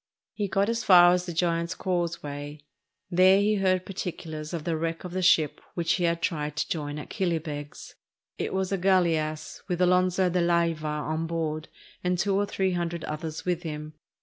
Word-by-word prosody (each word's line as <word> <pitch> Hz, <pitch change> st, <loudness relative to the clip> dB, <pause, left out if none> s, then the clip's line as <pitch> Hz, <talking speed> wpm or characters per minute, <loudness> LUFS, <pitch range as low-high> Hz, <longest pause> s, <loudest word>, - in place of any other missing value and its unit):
He 205 Hz, -2 st, -2 dB
got 195 Hz, +1 st, +1 dB
as 230 Hz, +1 st, -1 dB
far 175 Hz, -2 st, +8 dB
as 180 Hz, 0 st, -1 dB
the -, -, -3 dB
Giant's 170 Hz, +1 st, 0 dB
Causeway; 150 Hz, -6 st, -3 dB, 0.5 s
there 185 Hz, +2 st, +6 dB
he 210 Hz, +1 st, +2 dB
heard 185 Hz, -1 st, +1 dB
particulars 160 Hz, -5 st, -5 dB
of 170 Hz, -3 st, -4 dB
the 165 Hz, 0 st, -1 dB
wreck 165 Hz, +1 st, -3 dB
of 180 Hz, -, -6 dB
the 185 Hz, +1 st, -2 dB
ship 165 Hz, -5 st, +3 dB
which 170 Hz, -2 st, 0 dB
he 180 Hz, -, +1 dB
had 170 Hz, 0 st, 0 dB
tried 150 Hz, -3 st, -1 dB
to 160 Hz, -, -1 dB
join 145 Hz, -2 st, -3 dB
at 150 Hz, -, -8 dB
Killybegs. 160 Hz, -6 st, -3 dB, 0.5 s
It -, -, -2 dB
was 190 Hz, 0 st, -1 dB
a 195 Hz, -, 0 dB
gaUeass 165 Hz, -5 st, +1 dB
with 180 Hz, -3 st, -2 dB
Alonzo 180 Hz, +1 st, +3 dB
de 180 Hz, 0 st, +1 dB
Layva 170 Hz, -2 st, +1 dB, 0.2 s
on 155 Hz, +1 st, -2 dB
board 160 Hz, -2 st, -3 dB, 0.4 s
and 180 Hz, 0 st, +1 dB
two 195 Hz, +2 st, +1 dB
or 205 Hz, +1 st, +1 dB
three 190 Hz, -1 st, 0 dB
hundred 170 Hz, -2 st, -2 dB
others 155 Hz, +1 st, -5 dB
with 175 Hz, -1 st, 0 dB
him. 155 Hz, -2 st, -6 dB
170 Hz, 185 wpm, -27 LUFS, 155-185 Hz, 0.5 s, far